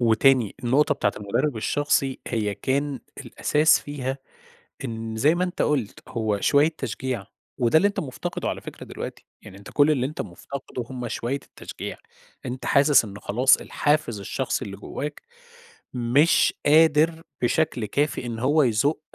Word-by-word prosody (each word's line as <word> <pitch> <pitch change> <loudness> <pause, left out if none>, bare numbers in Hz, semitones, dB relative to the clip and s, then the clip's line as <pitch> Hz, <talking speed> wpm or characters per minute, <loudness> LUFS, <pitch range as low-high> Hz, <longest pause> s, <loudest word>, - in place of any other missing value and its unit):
وتاني، 120 0 +4
النقطة 145 +5 +3
بتاعة 105 -6 0
المدرب 105 +7 -1
الشخصي 135 +3 0
هي 105 -4 -1
كان 140 +3 -1 0.2
الأساس 155 +2 +3
فيها، 135 -2 -4 0.7
إن 115 -2 -5
زي 145 +9 +4
ما 180 - +1
أنت 180 - -2
قُلت 135 -9 -1
هو 110 -4 -1
شوية 145 +7 +4
تشجيع، 125 -3 -4 0.3
وده 120 +3 +3
اللي 200 +6 +5
أنت 205 - -3
مفتقده 130 -5 -4
على - - -3
فكرة - - -9
دلوقتي، - - -7 0.2
يعني 95 - -12
أنت 100 - -12
كل 145 +1 +4
اللي 130 -4 +1
أنت 150 +3 -6
مفتقده 130 -3 -6
هُم 125 -2 -4
شوية 120 +3 -2
التشجيع، 140 - -8 0.5
أنت 125 +1 -5
حاسس 140 -2 +5
إن 100 -2 -8
خلاص 125 +6 +4
الحافز 145 -8 0
الشخصي 100 - -2
اللي - - -7
جواك 150 +1 -6 0.7
مش 125 +6 +3
قادر 160 +2 +4 0.2
بشكل 125 -2 +1
كافي 140 +2 -1
إن 115 -1 -4
هو 145 +6 +3
يزُق 130 +6 +1
130 Hz, 150 wpm, -24 LUFS, 115-145 Hz, 0.7 s, اللي